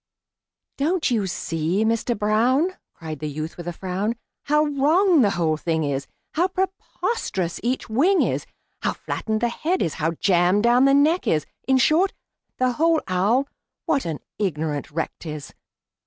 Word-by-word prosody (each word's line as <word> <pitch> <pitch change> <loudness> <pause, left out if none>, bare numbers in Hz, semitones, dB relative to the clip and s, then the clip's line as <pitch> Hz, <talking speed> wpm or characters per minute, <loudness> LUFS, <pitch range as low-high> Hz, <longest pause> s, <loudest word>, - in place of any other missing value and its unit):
"Don't 315 +1 +1
you 215 -5 +1
see, 170 +3 -1
Mister 230 +2 0
Brown," 240 - +2 0.2
Cried 160 -3 -7
the 155 - -3
youth, 155 +3 -5
with 175 -1 -8
a - - -1
frown, 190 +6 -2 0.3
"How 300 +1 +3
wrong 305 +4 +3
the 210 - +4
whole 160 -2 +1
thing 160 0 -1
is, 140 -1 -2 0.3
How 345 +4 +2
preposterous 375 - -2
each 250 +3 -1
wing 315 - +3
is, - - -2 0.3
How - - 0
flattened 220 -1 -3
the 240 - +2
head 345 +9 -1
is, 160 - -1
how 165 +2 +1
jammed 180 +3 +2
down 240 +2 +5
the 275 0 +5
neck 310 +5 +3
is 155 -2 +2 0.2
In 265 0 +4
short, 320 +9 +3 0.4
the 255 0 +2
whole 320 +5 +2
owl, 205 +9 +2 0.4
what 275 - +1
an 160 -3 -3 0.2
ignorant 155 -7 -2
wreck 160 +2 -2
't 165 - -7
is! 150 -2 -7
220 Hz, 165 wpm, -23 LUFS, -, 0.4 s, down